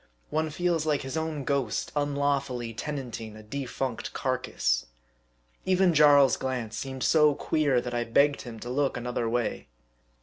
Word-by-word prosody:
One 155 +1 0
feels 165 0 0
like 150 -2 +1
his 135 +3 -5
own 160 -3 -2
ghost 135 -5 -1
unlaw 145 -1 +1
fully 120 -4 -5
tenanting 120 -5 -5
a 110 - -11
defunct 130 +1 -4
carcass. - - -1 0.8
Even 185 -1 +3
Jarl's 145 -3 +6
glance 125 -5 -3
seemed 130 +3 -4
so 150 -2 +5
queer, 145 -4 +1
that 120 0 -5
I 120 0 0
begged 140 +5 +3
him 115 -3 -8
to 120 - -6
look 135 0 0
another 120 -1 -2
way. 120 -1 -2
135 Hz, 155 wpm, -27 LUFS, 120-150 Hz, 0.8 s, Jarl's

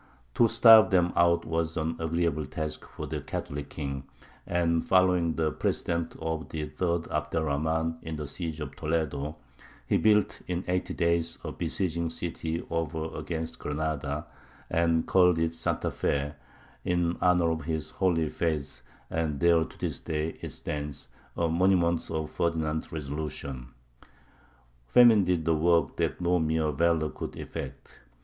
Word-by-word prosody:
To 115 - +5
starve 115 -1 +8
them 90 -3 +3
out 85 0 +3
was 80 0 -1
an 80 +1 -1
agreeable 80 -2 0
task 75 +2 -5
for - - -6
the - - -4
Catholic 70 0 -5
king; 70 -3 -5 0.4
and 85 -1 +1
following 90 -3 +3
the 80 -1 +1
precedent 85 +1 -1
of 80 0 -3
the 75 -1 -3
third 85 +2 -1
Abd 75 +1 -2
er 80 - +2
Rahmān 80 +2 -1
in 80 -1 -5
the 75 -1 -4
siege 80 +2 -5
of 70 -2 -6
Toledo, 75 -2 -2 0.5
he - - +2
built 105 -2 +3
in 90 0 -2
eighty 90 0 -1
days 85 -1 +1
a - - -4
besieging 85 -3 -2
city 80 0 -3
over 80 -1 -2
against 80 -1 -4
Granada, 75 0 -2 0.5
and 85 -1 +2
called 90 -2 +4
it 80 0 0
Santa 80 - -1
Fé, 70 +1 -1 0.5
in 85 -1 +1
honour 90 -2 +4
of 80 -1 -3
his 80 -2 -3
"Holy 85 -4 +1
Faith," 75 -6 -2 0.3
and 80 -4 -1
there 85 0 +5
to - - -11
this - - -3
day 80 +1 -3
it - - -5
stands, 75 -1 -5 0.3
a 85 - +2
monument 85 0 +2
of 80 -1 -3
Ferdinand's 80 -2 -1
resolution. 70 -4 -5 1.2
Famine 115 - +7
did 90 -3 0
the 80 - +3
work 80 -2 +2
that - - 0
no 90 0 +2
mere 80 -1 +1
valour 80 +1 +1
could - - -6
effect. - - -8
80 Hz, 150 wpm, -28 LUFS, 75-85 Hz, 1.2 s, starve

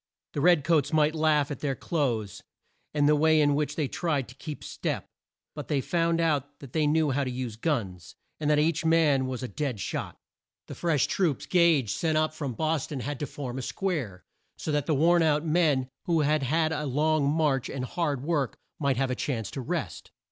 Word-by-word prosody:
The 145 - -2
red 175 -2 +5
coats 150 -3 +2
might 155 -1 +3
laugh 155 -2 +2
at 140 - -5
their 140 -3 -1
clothes, 120 - -2 0.5
and 145 -1 +2
the 150 - +5
way 155 +1 +4
in 145 -1 +4
which 150 0 -1
they 150 -3 0
tried 155 -5 -1
to - - -11
keep 150 +1 -7
step, - - -3 0.5
but - - -7
they 145 - +1
found 165 +3 +1
out 145 -3 0
that 135 -4 -12
they 155 -2 +2
knew 155 -1 +2
how 140 +2 0
to 130 - -2
use 125 -3 -4
guns, 100 - -3 0.2
and 150 -1 0
that 150 - +4
each 160 +2 +1
man 155 -5 +3
was 130 0 -4
a - - -2
dead 125 +1 -3
shot. - - -4 0.5
The - - -8
fresh 160 -6 +1
troops 170 -8 0
Gage 165 - +3
sent 160 -2 0
up 155 0 +1
from 145 -5 -4
Bos 155 +3 -1
ton 140 -4 -5
had 145 +1 -4
to 145 - -3
form 130 -1 -6
a - - -3
square, 130 - -3 0.3
so 155 - -3
that 145 -1 0
the 155 - +2
worn 170 +4 +4
out 155 -1 +2
men 155 -5 +2 0.2
who 165 -2 +2
had 150 0 +2
had 155 +4 +1
a 150 -1 -2
long 150 +1 +2
march 145 -4 +1
and 130 -2 -3
hard 145 -3 -2
work 145 -7 -1 0.2
might 140 -4 +1
have 135 0 0
a - - 0
chance 115 -8 -3
to 135 - -5
rest. 120 - -4
150 Hz, 215 wpm, -27 LUFS, 135-160 Hz, 0.5 s, red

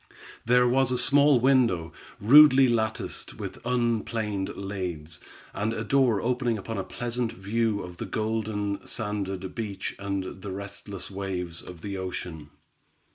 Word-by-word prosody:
There 125 +1 +5
was 130 +1 +3
a 125 - +1
small 145 0 +5
window, 115 - +2 0.3
rudely 135 +3 +8
latticed 110 -2 -2
with - - -7
unplaned 115 -4 -1
laths, 90 -6 -5 0.3
and 105 +3 -1
a 110 - -3
door 130 -5 +3
opening 120 -1 0
upon 110 +1 -5
a - - -2
pleasant 120 +3 -3
view 105 +2 -1
of 90 -1 -9
the - - -5
golden 110 -2 -2
sanded 100 -4 -4
beach 105 -4 -4
and 100 -1 -4
the 100 - -6
restless 100 0 -7
waves 90 -3 -4
of 90 -2 -11
the 100 +1 -5
ocean. 90 -5 -6
105 Hz, 135 wpm, -27 LUFS, 95-120 Hz, 0.3 s, rudely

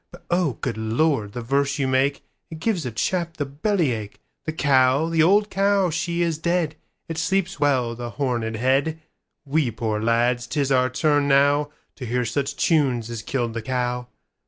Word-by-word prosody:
But - - -15
oh, 175 -6 +2
good - - -2
Lord, 110 -1 0
the 120 - -5
verse 140 +3 0
you 135 -2 0
make, 135 +2 +1 0.3
It 160 - -8
gives 170 - -1
a - - -4
chap 170 +8 -2
the 145 - -1
belly 155 +2 0
ache. 105 -3 -6 0.3
The 155 - -1
cow, 140 0 +3
the 165 -1 +2
old 205 +6 +4
cow, 195 -2 +2
she 170 +2 -1
is 165 -2 -1
dead; 170 -2 0 0.3
It 165 -1 -4
sleeps 190 +2 0
well, 130 -5 +2
the 120 0 -6
horned 120 -4 -2
head:We 140 +2 -1
poor 110 -1 -2
lads, 120 +1 +1
'tis 140 0 -1
our 130 -1 +3
turn 145 +2 +1
nowTo 145 -1 +1
hear 125 +1 0
such 140 +4 -2
tunes 130 -8 +1
as 115 -2 -5
killed 120 0 -2
the 115 - -3
cow. 125 +1 -2
140 Hz, 175 wpm, -23 LUFS, 120-160 Hz, 0.3 s, old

